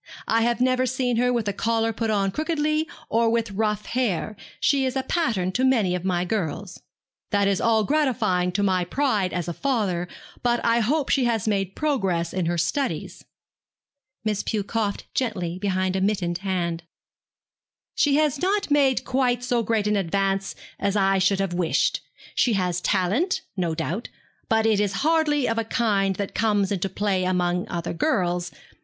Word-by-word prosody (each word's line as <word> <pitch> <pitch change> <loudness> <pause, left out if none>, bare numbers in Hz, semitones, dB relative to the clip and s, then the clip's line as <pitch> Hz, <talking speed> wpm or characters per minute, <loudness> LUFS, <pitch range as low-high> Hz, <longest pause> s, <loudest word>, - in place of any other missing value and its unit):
I 225 +1 +2
have 235 0 +1
never 255 0 +2
seen 250 -2 0
her 250 +1 +2
with 235 -3 -1
a 200 - 0
collar 225 +2 0
put 225 +1 -2
on 200 -2 +1
crookedly, 310 - 0 0.2
or 230 0 +2
with 230 -1 0
rough 210 +1 -1
hair. 215 -4 -1 0.2
She 275 -1 +2
is 260 0 -1
a 265 - 0
pattern 220 - 0
to 250 +7 -1
many 230 -9 +3
of 180 -1 -2
my 180 -1 0
girls.' 185 -1 -3 0.5
'That 200 -1 +2
is 195 -1 +1
all 220 -1 +3
gratifying 220 -10 +1
to 205 - 0
my 185 -2 +2
pride 210 -3 0
as 175 -2 -3
a 170 - -2
father; 200 - -1 0.3
but 240 -1 +2
I 230 0 +3
hope 275 +6 0
she 265 -3 +3
has 225 -3 0
made 195 -3 0
progress 195 - 0
in 180 -3 -1
her 175 0 0
studies.' 215 - -2 1.0
Miss 210 -2 0
Pew 215 -3 -2
coughed 210 -1 -2
gently 180 -8 -2
behind 185 -1 0
a 190 - 0
mittened 190 -4 0
hand. 175 -3 -2 1.1
'She 290 -2 +2
has 295 -2 +1
not 395 -3 0
made 275 -3 +3
quite 250 -2 +1
so 245 -1 +1
great 220 -1 0
an 210 0 +2
advance 195 +1 0 0.2
as 200 0 0
I 195 -1 +3
should 195 +1 +2
have 195 -2 -1
wished. 175 -2 +1 0.3
She 240 - +2
has 180 -3 0
talent, 220 - +1
no 175 -4 -1
doubt; 170 +7 -3 0.4
but 220 0 +3
it 220 -2 +3
is 205 -2 +1
hardly 305 -3 +2
of 230 0 0
a - - 0
kind 205 -4 +1
that 200 +1 -4
comes 205 -3 +1
into 195 -1 -1
play 190 -1 0
among 180 -1 0
other 170 -1 -3
girls. 175 - 0
210 Hz, 175 wpm, -24 LUFS, 185-245 Hz, 1.1 s, many